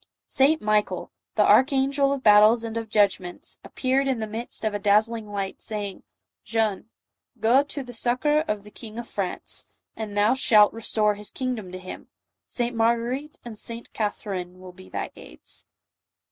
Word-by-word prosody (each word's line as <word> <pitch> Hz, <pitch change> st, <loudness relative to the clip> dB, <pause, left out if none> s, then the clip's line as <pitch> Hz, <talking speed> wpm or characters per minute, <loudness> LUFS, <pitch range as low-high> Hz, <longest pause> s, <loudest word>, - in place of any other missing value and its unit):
St. 290 Hz, +3 st, +3 dB
Michael, 210 Hz, 0 st, 0 dB
" -, -, -61 dB
the -, -, +4 dB
archangel 275 Hz, +1 st, +4 dB
of 275 Hz, -2 st, -2 dB
battles 215 Hz, +2 st, +6 dB
and 225 Hz, -1 st, -5 dB
of 225 Hz, -1 st, -4 dB
judgments," 195 Hz, -4 st, 0 dB
appeared 270 Hz, +1 st, 0 dB
in 265 Hz, -2 st, +1 dB
the 220 Hz, -, -2 dB
midst 225 Hz, +1 st, -5 dB
of 215 Hz, -, 0 dB
a 205 Hz, -, -2 dB
dazzling 215 Hz, +2 st, +2 dB
light, 195 Hz, -1 st, -4 dB
saying, 205 Hz, -3 st, -4 dB, 0.2 s
" -, -, -63 dB
Jeanne, 220 Hz, -1 st, -1 dB, 0.5 s
go 240 Hz, +5 st, +5 dB
to 285 Hz, -1 st, -5 dB
the 245 Hz, -1 st, -10 dB
succor 250 Hz, +6 st, +2 dB
of 210 Hz, -1 st, -2 dB
the_King 215 Hz, +1 st, -10 dB
of 235 Hz, -1 st, -5 dB
France, 195 Hz, -3 st, -4 dB, 0.3 s
and 210 Hz, -2 st, -5 dB
thou 205 Hz, +3 st, +4 dB
shalt 215 Hz, -5 st, +5 dB
restore 215 Hz, -1 st, +1 dB
his 205 Hz, 0 st, -6 dB
kingdom 245 Hz, -8 st, -4 dB
to 185 Hz, -, -6 dB
hinT 185 Hz, 0 st, -9 dB, 0.4 s
St 240 Hz, -1 st, -2 dB
"Marguerite 235 Hz, +6 st, 0 dB
and 235 Hz, -2 st, -7 dB
St. 230 Hz, 0 st, -6 dB
Catherine 190 Hz, -4 st, -3 dB
will 185 Hz, -1 st, -11 dB
be 185 Hz, +1 st, -14 dB
thy -, -, -4 dB
aids." -, -, -10 dB
225 Hz, 170 wpm, -25 LUFS, 205-245 Hz, 0.5 s, battles